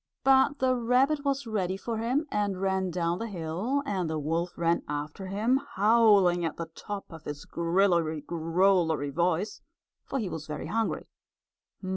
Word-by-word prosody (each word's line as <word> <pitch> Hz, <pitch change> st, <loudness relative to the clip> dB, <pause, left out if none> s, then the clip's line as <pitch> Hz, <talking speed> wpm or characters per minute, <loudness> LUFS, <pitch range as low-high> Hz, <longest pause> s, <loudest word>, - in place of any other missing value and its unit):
But 270 Hz, +1 st, +4 dB
the 260 Hz, -1 st, +2 dB
rabbit 255 Hz, +5 st, +2 dB
was 275 Hz, -1 st, -1 dB
ready 190 Hz, -4 st, -1 dB
for 225 Hz, +3 st, -4 dB
him 255 Hz, +7 st, 0 dB
and 205 Hz, -3 st, -1 dB
ran 190 Hz, -1 st, 0 dB
down 170 Hz, 0 st, -1 dB
the 230 Hz, -, -3 dB
hill 195 Hz, -, -2 dB
and 185 Hz, -, -1 dB
the 160 Hz, -, -2 dB
wolf 165 Hz, +4 st, -2 dB
ran 170 Hz, 0 st, +1 dB
after 150 Hz, +6 st, -5 dB
him, 225 Hz, +8 st, +1 dB
howling 205 Hz, -4 st, +5 dB
at 165 Hz, -2 st, -2 dB
the 165 Hz, -1 st, -6 dB
top 205 Hz, +2 st, -6 dB
of 165 Hz, -1 st, -11 dB
his 145 Hz, 0 st, -6 dB
grillery 170 Hz, -2 st, +1 dB
growlery 165 Hz, -1 st, +1 dB
voice, 175 Hz, +5 st, 0 dB, 0.5 s
for -, -, -2 dB
he 220 Hz, -7 st, -2 dB
was 160 Hz, -3 st, -6 dB
very 150 Hz, -1 st, -5 dB
hungry. 225 Hz, 0 st, -1 dB
190 Hz, 160 wpm, -28 LUFS, 165-225 Hz, 0.5 s, howling